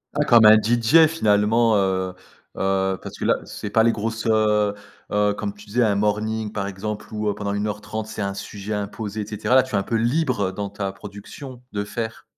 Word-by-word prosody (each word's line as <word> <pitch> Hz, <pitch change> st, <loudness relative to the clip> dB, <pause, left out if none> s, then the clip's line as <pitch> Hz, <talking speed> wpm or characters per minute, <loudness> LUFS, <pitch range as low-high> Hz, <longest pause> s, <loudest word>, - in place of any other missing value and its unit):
Ah, -, -, +2 dB
comme 115 Hz, -2 st, +6 dB
un 110 Hz, 0 st, +9 dB
DJ 120 Hz, +9 st, +4 dB
finalement, 110 Hz, -5 st, +2 dB
heu 95 Hz, -2 st, 0 dB, 0.4 s
heu, 95 Hz, -1 st, 0 dB
parce -, -, -9 dB
que -, -, -4 dB
là -, -, +4 dB
c'est 105 Hz, -, -7 dB
pas 110 Hz, -, +4 dB
les 115 Hz, -, +4 dB
grosses, 115 Hz, +1 st, -3 dB
heu 105 Hz, -2 st, +2 dB, 0.4 s
heu, 105 Hz, 0 st, +2 dB
comme 105 Hz, 0 st, -5 dB
tu 105 Hz, 0 st, -14 dB
disais, 115 Hz, +4 st, 0 dB
un 105 Hz, -3 st, +2 dB
morning 105 Hz, +1 st, -1 dB
par 100 Hz, -2 st, -2 dB
exemple, 105 Hz, +3 st, -6 dB
où, 105 Hz, -1 st, -2 dB
heu, -, -, 0 dB
pendant 100 Hz, 0 st, -3 dB
1 105 Hz, +1 st, -1 dB
heure 105 Hz, 0 st, -4 dB
30, 110 Hz, +1 st, -5 dB
c'est 110 Hz, 0 st, -6 dB
un 100 Hz, -1 st, -2 dB
sujet 105 Hz, +1 st, -5 dB
imposé 105 Hz, +1 st, -4 dB
et -, -, -4 dB
cetera. 110 Hz, +4 st, 0 dB
Là, 130 Hz, -, +7 dB
tu 130 Hz, -, -11 dB
es -, -, +3 dB
un 100 Hz, -, +2 dB
peu 115 Hz, -, -3 dB
libre 120 Hz, -4 st, +1 dB
dans 100 Hz, +1 st, -4 dB
ta 100 Hz, -1 st, -4 dB
production 105 Hz, +7 st, -10 dB
de 100 Hz, 0 st, -2 dB
faire. 110 Hz, +2 st, -5 dB
105 Hz, 225 wpm, -22 LUFS, 100-110 Hz, 0.4 s, un